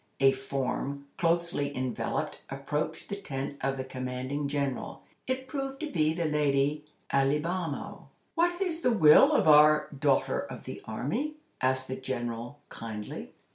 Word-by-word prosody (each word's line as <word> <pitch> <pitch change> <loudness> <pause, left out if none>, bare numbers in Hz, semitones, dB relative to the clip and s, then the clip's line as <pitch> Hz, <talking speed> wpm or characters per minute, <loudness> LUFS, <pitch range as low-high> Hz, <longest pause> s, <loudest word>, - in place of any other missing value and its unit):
A 135 0 +6
form, 135 +1 -3
closely 165 -4 0
enveloped, 130 -1 -2
approached 150 +3 -3
the 200 - -4
tent 140 -1 -4
of 135 +1 0
the 130 - -2
commanding 130 +2 -3
General. 140 -2 -2 0.2
It 260 0 -2
proved 270 0 -4
to 310 - -3
be 155 -3 +2
the 170 -1 -1
lady 150 -1 +1 0.3
Alibamo. 150 +4 -1 0.2
"What 345 +1 +2
is 345 -4 -1
the 250 - +3
will 155 -9 +7
of - - +3
our 150 0 +7
'daughter 140 -1 +1
of - - -6
the - - -7
army?'" 160 - -2 0.3
asked 130 0 +1
the 130 - -3
General, 120 0 -4
kindly. 110 -2 -7
145 Hz, 140 wpm, -29 LUFS, 130-170 Hz, 0.3 s, will